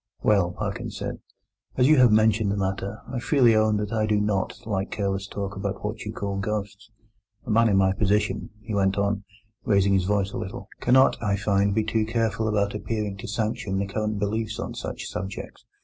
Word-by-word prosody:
"Well," 100 Hz, -5 st, +3 dB
Parkins -, -, -4 dB
said, -, -, -4 dB, 0.6 s
"as 125 Hz, 0 st, +5 dB
you 155 Hz, 0 st, +6 dB
have 125 Hz, -3 st, +7 dB
mentioned 110 Hz, -1 st, +3 dB
the 100 Hz, -, -1 dB
matter, 95 Hz, +2 st, -2 dB
I 125 Hz, -, -1 dB
freely 120 Hz, -3 st, +4 dB
own 110 Hz, -1 st, +3 dB
that 105 Hz, +1 st, -3 dB
I 110 Hz, -1 st, +1 dB
do 105 Hz, -1 st, +2 dB
not 105 Hz, -2 st, -1 dB
like 100 Hz, -3 st, -2 dB
careless 100 Hz, -1 st, -2 dB
talk 100 Hz, -1 st, -5 dB
about 100 Hz, +1 st, -4 dB
what 105 Hz, +2 st, -4 dB
you 105 Hz, -, -3 dB
call 100 Hz, -2 st, -3 dB
ghosts. 105 Hz, +1 st, -4 dB, 0.6 s
A -, -, -3 dB
man 115 Hz, +1 st, +4 dB
in 100 Hz, -, +3 dB
my 95 Hz, 0 st, +4 dB
position," 105 Hz, +1 st, 0 dB
he 110 Hz, 0 st, -5 dB
went 95 Hz, 0 st, +2 dB
on, 100 Hz, 0 st, 0 dB, 0.4 s
raising 100 Hz, -1 st, +3 dB
his 95 Hz, -2 st, +2 dB
voice 100 Hz, 0 st, +1 dB
a -, -, -4 dB
little, 95 Hz, +1 st, -6 dB
"cannot, 130 Hz, +2 st, +4 dB
I 100 Hz, -3 st, +1 dB
find, 100 Hz, 0 st, +1 dB
be 110 Hz, -, +2 dB
too 110 Hz, 0 st, 0 dB
careful 110 Hz, -1 st, 0 dB
about 100 Hz, -2 st, +1 dB
appearing 105 Hz, -1 st, -3 dB
to -, -, -8 dB
sanction 110 Hz, -2 st, -2 dB
the 100 Hz, -, 0 dB
current 105 Hz, +1 st, -2 dB
beliefs 110 Hz, +2 st, -2 dB
on -, -, -4 dB
such -, -, -5 dB
subjects. 95 Hz, +2 st, -6 dB
105 Hz, 200 wpm, -25 LUFS, 100-110 Hz, 0.6 s, have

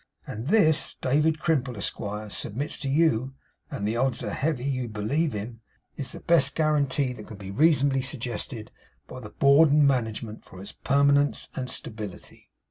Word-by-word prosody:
And 110 Hz, +4 st, -6 dB
this, 160 Hz, -6 st, +3 dB
David 150 Hz, +4 st, +2 dB
Crimple, 140 Hz, -7 st, -1 dB
Esquire, 105 Hz, +1 st, -4 dB
submits 130 Hz, +11 st, -3 dB
to 140 Hz, -, -3 dB
you 135 Hz, -4 st, +1 dB, 0.3 s
(and 100 Hz, -, -3 dB
the 110 Hz, +2 st, -1 dB
odds 130 Hz, -1 st, 0 dB
are -, -, -3 dB
heavy 145 Hz, -4 st, -1 dB
you 130 Hz, -3 st, -2 dB
believe 115 Hz, +9 st, -1 dB
him), 110 Hz, +3 st, -6 dB, 0.3 s
is 140 Hz, -, -3 dB
the -, -, -8 dB
best 145 Hz, -5 st, +3 dB
guarantee 145 Hz, -4 st, +1 dB
that 110 Hz, -4 st, -11 dB
can 100 Hz, -2 st, -9 dB
reasonably 140 Hz, -3 st, +3 dB
be -, -, -3 dB
suggested 120 Hz, -3 st, -4 dB, 0.4 s
by 130 Hz, -, -9 dB
the 105 Hz, -4 st, -9 dB
Board 140 Hz, +7 st, +5 dB
of 145 Hz, -, +3 dB
Management 115 Hz, -6 st, +1 dB
for 90 Hz, -, -13 dB
its 100 Hz, -, -8 dB
permanence 140 Hz, +1 st, +2 dB
and 130 Hz, -1 st, -4 dB
stability. 105 Hz, -6 st, -7 dB
130 Hz, 165 wpm, -26 LUFS, 110-145 Hz, 0.4 s, Board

